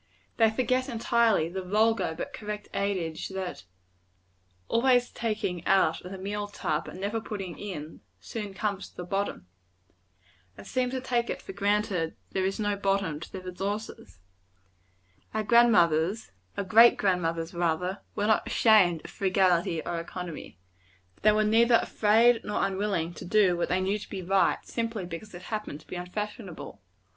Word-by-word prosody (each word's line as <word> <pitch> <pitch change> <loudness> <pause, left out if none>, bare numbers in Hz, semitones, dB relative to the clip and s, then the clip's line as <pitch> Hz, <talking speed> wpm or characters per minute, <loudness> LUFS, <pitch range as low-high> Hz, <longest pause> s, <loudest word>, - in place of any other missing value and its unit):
They 225 -1 +5
forget, 255 +3 0
entirely, 230 -6 +2
the 190 +3 -4
vulgar 215 -1 +1
but - - -5
correct 210 0 -6
adage, 185 -5 -2
that 190 - -5 1.0
"always 245 +1 +3
taking 210 -6 -2
out 190 -4 +3
of 180 - -9
the 195 - -6
meal 205 +2 -3
tub, 155 -6 -2
and - - -9
never 205 +3 -2
putting 195 -6 -6
in, 160 -6 -7 0.2
soon 210 -4 -6
comes 200 -1 -3
to - - -28
the 180 - -4
bottom" 195 - -3 1.1
and 100 - -11
seem 255 -1 0
to 260 0 -3
take 240 -2 0
it - - -3
for - - -9
granted 200 -4 0 0.2
there 190 0 0
is 195 - -3
no 205 -1 0
bottom 195 -6 0
to 170 - -10
their 190 -1 -7
resources. 195 - -5 1.2
Our 220 - 0
grand 235 +2 +6
mothers 170 - +2 0.3
our - - 0
great 225 +5 +7
grand 185 -3 +1
mothers, 165 +1 -2
rather 175 +3 -1
were 205 - 0
not 220 0 +2
ashamed 185 -8 +4
of - - -9
frugality 185 -4 +1
or 170 -1 -2
economy. 170 - -7 0.6
They 215 - +6
were 215 0 +2
neither 230 +3 +4
afraid 230 +2 +3
nor 210 - 0
unwilling 190 -4 -1
to - - -9
do 190 -1 +4
what 175 - -1
they 180 - +2
knew 195 +3 0
to - - -10
be 190 -2 -5
right, 190 +1 +2
simply 230 -4 -3
because 180 +4 -8
it 175 - -10
happened 210 -9 -4
to - - -21
be - - -7
unfashionable. 180 - -6
195 Hz, 165 wpm, -28 LUFS, 180-215 Hz, 1.2 s, great